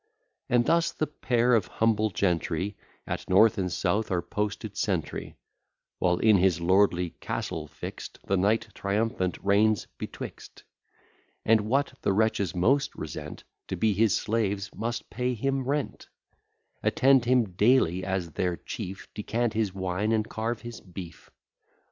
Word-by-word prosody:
And 120 -1 +3
thus 170 +4 +3
the 155 - -1
pair 125 -4 +1
of 115 - +3
humble 110 -1 +1
gentry 90 +1 -1 0.3
At - - -5
north 100 +3 +5
and 90 -2 -1
south 105 +5 0
are 90 -2 0
posted 105 +2 -3
sentry; 95 -8 -2 0.6
While 90 -1 +2
in 110 0 +5
his 90 -2 +3
lordly 90 -1 +3
castle - - -4
fixt, - - -8
The 100 - +1
knight 105 +4 +1
triumphant 100 -2 -1
reigns 105 0 +3
betwixt: - - -8 0.8
And, 110 -1 +5
what 130 +6 0
the 100 - +1
wretches 100 -4 +1
most 135 +10 +2
resent, 75 -1 -7 0.2
To - - -3
be 110 -2 +2
his 105 0 +3
slaves, 100 -3 -1
must 115 +2 -4
pay 125 0 -1
him 135 +3 -1
rent; 145 +1 -2 0.7
Attend 135 -2 +4
him 120 -5 +3
daily 95 -3 +3
as 95 -3 -2
their 90 +1 -1
chief, 95 -3 -7
Decant 115 +2 -1
his 110 -3 0
wine, 95 +3 -1
and 110 -1 +1
carve 115 +1 -3
his 120 -1 -8
beef. 90 -2 -10
105 Hz, 140 wpm, -27 LUFS, 95-115 Hz, 0.8 s, north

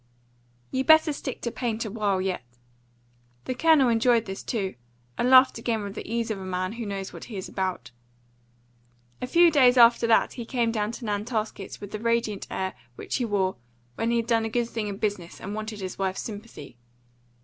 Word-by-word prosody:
"You 260 - 0
better 315 +1 +6
stick 270 -2 -6
to 235 - -2
paint 230 -2 -2
a 215 - -5
while 205 -3 0
yet." 185 -4 -2 1.0
The 255 - -2
Colonel 310 -1 +4
enjoyed 230 0 +3
this 190 0 -6
too, 195 -5 -2 0.4
and 245 - +1
laughed 260 -2 +7
again 225 -2 -1
with 200 -1 -6
the 220 - -7
ease 230 -1 -1
of 205 - -3
a - - -7
man 185 0 -2
who 235 -2 -5
knows 195 -1 -5
what - - -9
he 215 - -7
is 185 - -5
about. 185 -10 -3 1.3
A 250 - -2
few 340 +5 +5
days 260 -4 +5
after 235 0 +6
that 230 - +3
he 240 - -6
came 235 -2 0
down 215 -1 -1
to 235 - -7
Nantasket 210 -1 -3
with 205 - -9
the 215 - -4
radiant 230 -3 -1
air 190 0 -3 0.2
which - - -3
he 245 - -1
wore 195 -4 0 0.4
when 225 - -1
he 235 - +2
had 230 - 0
done 230 -1 +2
a 225 - -2
good 240 +1 0
thing 225 -3 -3
in 200 -1 -5
business 200 -5 -3
and 200 - -6
wanted 215 -1 -5
his 185 0 -6
wife's 190 -1 -1
sympathy. 205 - -9
225 Hz, 205 wpm, -26 LUFS, 195-240 Hz, 1.3 s, laughed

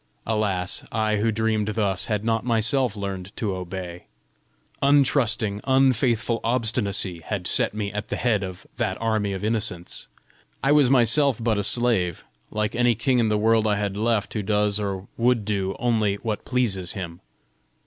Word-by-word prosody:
Alas, 100 -5 -1
I 110 -1 0
who 110 +2 +1
dreamed 110 -1 0
thus, 100 -3 0
had 105 -1 -2
not 115 -1 +1
myself 120 0 +1
learned 100 -2 -5
to 105 -4 -1
obey! 90 -1 -7 0.8
Untrusting, 125 -7 +2
unfaithful 125 -3 +2
obstinacy 110 -6 0
had 90 +2 -4
set - - 0
me 105 -2 -3
at 105 0 -4
the - - -3
head 115 -4 +1
of 95 -1 -7
that - - -1
army 110 -3 0
of 95 - -5
innocents! 105 -5 -2 0.6
I 135 - +3
was 145 -4 +5
myself 130 +1 +4
but 115 -2 0
a - - 0
slave, 105 -7 +1 0.2
like 105 0 -2
any 120 -1 +2
king 125 +3 +1
in 115 -2 +2
the 105 - +2
world 110 +1 +3
I 105 - +2
had 100 -1 -2
left 110 -1 0
who 110 - -2
does 105 0 +1
or 100 -2 -4
would 120 -2 +2
do 100 -2 -1
only 110 -4 +1
what 105 0 -4
pleases 100 -8 -1
him! 85 -4 -7
110 Hz, 165 wpm, -24 LUFS, 100-115 Hz, 0.8 s, was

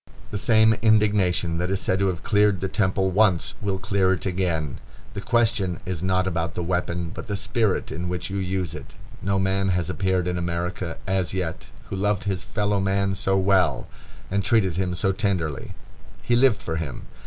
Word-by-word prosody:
The 105 - -2
same 110 0 +5
indignation 100 -6 +3
that 90 +1 -1
is 95 0 0
said 95 -1 0
to 100 - +2
have 90 -4 -2
cleared 105 -2 +3
the 95 - -2
temple 95 -1 +1
once 95 -3 +3
will 100 -2 -1
clear 95 -1 +1
it 90 - -3
again. 85 -7 -1 0.3
The 100 - -5
question 110 -6 +1
is 90 -3 -3
not 95 0 +1
about 85 -3 -2
the 90 - -2
weapon, 90 -1 -2
but - - -8
the 100 - -2
spirit 110 0 0
in 85 +2 -3
which 90 +2 -4
you 100 - -2
use 95 -2 -2
it. - - -10 0.3
No 100 -1 0
man 95 0 +1
has 90 -1 0
appeared 95 -2 0
in 90 0 -1
America, 85 0 -3
as 95 -2 -1
yet, 90 -3 -3 0.2
who - - -2
loved 100 0 0
his 95 -2 -2
fellow 105 -1 0
man 95 0 +1
so 95 0 +1
well, 95 -8 +2 0.4
and 100 0 +1
treated 110 -7 +2
him 90 -1 -1
so 95 +2 +1
tenderly. 95 -7 -2 0.5
He 120 - +2
lived 125 -2 +3
for 80 -1 -3
him. 75 -6 -5
95 Hz, 190 wpm, -24 LUFS, 90-100 Hz, 0.5 s, same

